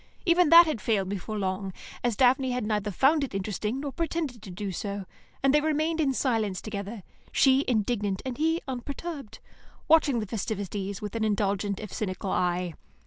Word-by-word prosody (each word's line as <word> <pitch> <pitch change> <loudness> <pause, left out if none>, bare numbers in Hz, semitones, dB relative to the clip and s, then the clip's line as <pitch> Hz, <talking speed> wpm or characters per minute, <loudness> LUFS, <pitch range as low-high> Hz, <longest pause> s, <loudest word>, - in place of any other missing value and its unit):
Even 345 -2 +4
that 340 +2 +10
had 305 -9 -2
failed 200 -4 +1
before 205 +2 -4
long, 190 0 -2 0.3
as 240 -3 +1
Daphne 260 +1 +4
had 250 -3 -1
neither 210 -1 0
found 275 - +3
it 260 - -4
interesting 210 +5 -2
nor 285 -1 -3
pretended 315 -6 -3
to 210 - -10
do 195 +2 -4
so, 200 +2 -4 0.4
and 275 0 +4
they 300 - +5
remained 315 +1 +1
in 280 -3 +2
silence 225 -8 0
together, 205 0 -6 0.3
she 270 0 +4
indignant 210 -4 0
and 260 +1 -4
he 325 +2 +1
unperturbed, 275 +1 -6 0.5
watching 305 -6 +4
the 215 - -2
festivities 200 -1 -4
with 210 +1 -5
an 225 - 0
indulgent, 200 -1 0
if 210 -3 -7
cynical, 190 -2 -3
eye. 180 -1 0
220 Hz, 175 wpm, -27 LUFS, 200-275 Hz, 0.5 s, that